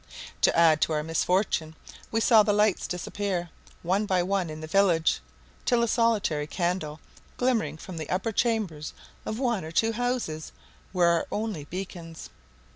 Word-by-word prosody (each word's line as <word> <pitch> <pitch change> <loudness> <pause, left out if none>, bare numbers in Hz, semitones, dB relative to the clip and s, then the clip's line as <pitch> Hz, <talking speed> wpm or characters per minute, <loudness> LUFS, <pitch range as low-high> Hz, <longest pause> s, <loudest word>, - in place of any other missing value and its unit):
To - - +4
add 160 -2 +5
to 160 - +2
our 150 0 0
misfortune 165 0 0 0.3
we 225 - 0
saw 225 -1 +7
the 210 - +2
lights 210 -1 +2
disappear, 180 0 -3 0.3
one 195 +5 +1
by 185 -2 +2
one, 190 -2 0
in 155 0 -7
the 155 - -6
village, 165 - +3 0.4
till 240 -1 +2
a - - +2
solitary 215 -11 +1
candle, 170 -3 -2 0.4
glimmering 225 - +1
from 180 +1 -9
the 155 -2 -5
upper 190 +5 0
chambers 205 -10 -1 0.3
of 215 - -2
one 240 -7 0
or 160 - -6
two 225 +6 +2
houses, 235 -10 -2 0.4
were 180 -2 +3
our 170 -1 +2
only 210 -9 -3
beacons. 170 -1 -7
185 Hz, 160 wpm, -27 LUFS, 160-215 Hz, 0.4 s, saw